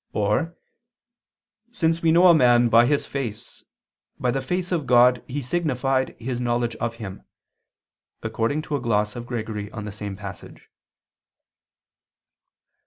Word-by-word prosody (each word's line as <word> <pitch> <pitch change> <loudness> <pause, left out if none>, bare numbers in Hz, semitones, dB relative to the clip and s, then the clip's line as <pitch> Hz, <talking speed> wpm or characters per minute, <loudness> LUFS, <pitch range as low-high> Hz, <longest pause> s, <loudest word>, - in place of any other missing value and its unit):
Or, 105 +12 0 1.1
"since 165 -7 0
we 165 - +3
know 175 +3 +5
a 175 - +8
man 120 -5 +5
by 115 +1 +6
his 145 +1 +1
face, 120 -4 -6 0.6
by 125 - +1
the 135 +2 -1
face 180 +6 -3
of 160 -7 -1
God 125 0 +5
he 140 +2 -4
signified 135 -3 -1
his 125 +1 -4
knowledge 120 -1 -1
of 115 0 -3
Him," 100 -5 -8 1.0
according 115 +7 -1
to 150 - -3
a 140 - -2
gloss 105 -3 0
of 120 0 -7
Gregory 110 -4 -4
on 110 - -6
the 105 - -5
same 100 -1 -6
passage. 100 -1 -10
120 Hz, 140 wpm, -24 LUFS, 110-145 Hz, 1.1 s, a